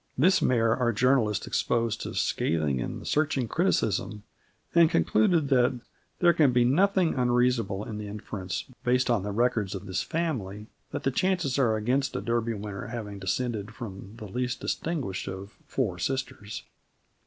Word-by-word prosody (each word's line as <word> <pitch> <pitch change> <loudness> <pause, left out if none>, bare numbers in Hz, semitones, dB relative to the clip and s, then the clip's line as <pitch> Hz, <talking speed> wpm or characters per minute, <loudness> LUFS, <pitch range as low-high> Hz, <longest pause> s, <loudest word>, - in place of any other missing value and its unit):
This 180 +8 +4
mare 115 -2 +3
our 125 -2 +1
journalist 115 -2 +2
exposed 115 -2 0
to - - -5
scathing 75 -5 0
and - - -5
searching 145 -5 +1
criticism, 110 - 0 0.5
and 170 -2 +6
concluded 135 - +2
that 125 -2 +3 0.4
"there 175 -1 +5
can 150 -5 +4
be 125 0 +3
nothing 185 +5 +3
unreasonable 120 -5 +1
in 105 -1 -6
the 105 - -5
inference, 100 -3 -5 0.2
based 125 0 +2
on 115 -4 +2
the 100 - -4
records 110 -3 +1
of 95 0 -7
this 95 -3 -1
family, 120 - -3 0.2
that - - -5
the 135 - +1
chances 175 -4 +1
are 115 -5 +3
against 130 +6 0
a - - -1
Derby 115 -1 0
winner 100 -1 -6
having 105 -4 -6
descended 105 +1 -2
from 100 -4 -8
the 110 - -8
least 125 +4 -2
distinguished 135 - -3
of... 95 +1 -6 0.2
four 100 -10 -1
sisters." 130 -3 -3
120 Hz, 155 wpm, -27 LUFS, 105-130 Hz, 0.5 s, and